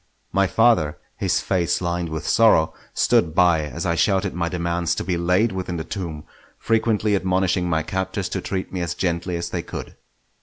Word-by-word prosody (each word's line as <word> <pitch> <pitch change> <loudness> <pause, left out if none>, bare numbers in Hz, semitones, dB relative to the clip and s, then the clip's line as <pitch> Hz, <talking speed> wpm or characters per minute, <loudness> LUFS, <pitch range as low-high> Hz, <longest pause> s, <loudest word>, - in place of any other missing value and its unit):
My 100 0 +2
father, 115 -9 +3 0.2
his - - +1
face 85 -5 0
lined 85 -1 -2
with 80 0 -5
sorrow, 110 -9 +4 0.2
stood 80 - +2
by 85 -4 +4
as 85 +4 -5
I 85 - +1
shouted 95 +2 +1
my 85 -1 -1
demands 85 -1 -1
to - - -3
be 90 - -1
laid 90 +6 +2
within 90 -2 -4
the 80 - -3
tomb; 85 -5 -5 0.3
frequently 110 -2 +1
admonishing 95 -1 +1
my 80 -1 +1
captors 95 +2 -2
to - - -3
treat 95 -1 -4
me 90 - -2
as 85 -3 -2
gently 90 0 -1
as 85 - -4
they - - -2
could. - - -8
90 Hz, 185 wpm, -22 LUFS, 85-95 Hz, 0.3 s, sorrow